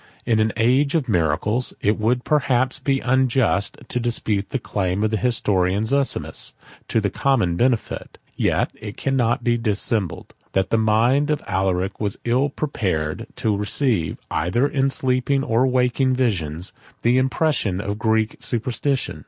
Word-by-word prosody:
In 115 -2 +2
an 110 0 +2
age 130 +7 +2
of 150 -5 +1
miracles, 105 +6 +1
it 105 +2 +1
would 120 +3 +1
perhaps 130 -4 +1
be 135 0 0
unjust 125 -5 +1
to 125 - -2
dispute 110 -4 -1
the - - -1
claim 100 -4 -2
of 110 - +1
the 110 - +1
historian 100 -5 +1
Zosimus 140 +3 0 0.3
to - - +1
the 100 -2 -1
common 115 -11 +1
benefit: 120 +4 -1 0.2
yet - - +1
it 105 0 -7
cannot 125 -3 0
be 120 0 +1
dissembled, 105 -3 -1 0.2
that 95 -1 0
the 115 - +3
mind 120 +7 +3
of 150 -1 0
Alaric 95 0 -1
was 105 -2 -2
ill 130 +4 +2
prepared 95 - -2
to 110 -2 0
receive, 105 - 0
either 90 - +1
in 135 -1 +1
sleeping 135 +1 +1
or 125 -1 +2
waking 130 +1 +2
visions, 90 - -1 0.3
the 120 +2 +4
impressions 130 - 0
of 100 +1 -4
Greek 110 -1 +1
superstition. 125 +3 -1
115 Hz, 150 wpm, -22 LUFS, 100-130 Hz, 0.3 s, the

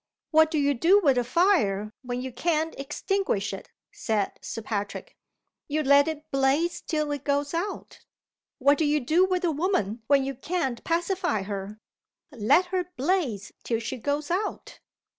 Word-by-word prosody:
"What 315 0 +5
do 315 - -1
you 285 -1 +2
do 345 - +5
with 275 -9 +3
a - - +1
fire, 235 - +2
when 250 -1 -4
you 260 - -5
can't 320 +4 0
extinguish 290 - -1
it?" 195 - -8 0.2
said 215 -3 -1
Sir 225 - -6
Patrick. 205 - -4 0.5
"You 310 +1 -1
let 280 +1 +5
it 315 0 -5
blaze 275 +6 +1
till 305 -2 -2
it 285 -2 -4
goes 285 +1 0
out. 355 +5 -4 0.5
What 285 +1 +3
do 315 - +2
you 295 +1 +2
do 320 +8 +3
with 370 -1 0
a 335 - +2
woman 285 - -1
when 280 -2 +4
you 275 - -3
can't 270 -3 -3
pacify 345 - 0
her? 200 +1 -5 0.5
Let 255 - +3
her 365 -1 +1
blaze 265 - -1
till 230 - 0
she 230 +3 -4
goes 290 +5 -2
out." 400 +4 -3
285 Hz, 165 wpm, -26 LUFS, 240-340 Hz, 0.5 s, What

